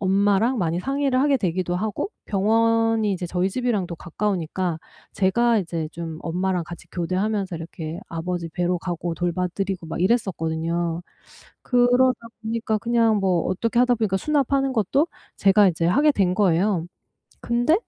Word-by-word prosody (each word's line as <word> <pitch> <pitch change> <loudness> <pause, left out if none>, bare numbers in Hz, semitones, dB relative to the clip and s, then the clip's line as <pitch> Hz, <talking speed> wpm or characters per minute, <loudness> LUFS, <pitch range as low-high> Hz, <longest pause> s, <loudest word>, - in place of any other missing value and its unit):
엄마랑 200 +5 +2
많이 170 -1 0
상의를 275 +1 0
하게 275 -1 +3
되기도 180 -1 -1
하고 220 - -2 0.2
병원이 225 +1 +2
이제 180 -2 -2
저희 180 +2 0
집이랑도 210 -6 -1
가까우니까 180 -2 -2 0.3
제가 230 +5 +2
이제 165 -4 -3
좀 165 -2 -6
엄마랑 180 +1 -1
같이 170 0 -10
교대하면서 185 +1 -1
이렇게 165 0 -6
아버지 170 0 -4
뵈러 175 +1 0
가고 175 -1 -3
돌봐드리고 180 +1 -2
막 160 - -5
이랬었거든요. 170 -5 0 0.6
그러다 245 +1 +3 0.2
보니까 220 -1 -1
그냥 230 0 +2
뭐 185 -3 +1
어떻게 230 +6 -1
하다 245 -1 +4
보니까 210 -4 0
수납하는 275 +2 +1
것도 260 - +1 0.3
제가 195 0 +5
이제 165 -1 -1
하게 290 - +4
된 185 -8 +1
거예요. 185 -2 +2 0.6
근데 240 +6 +2
190 Hz, 345 characters per minute, -23 LUFS, 175-230 Hz, 0.6 s, 제가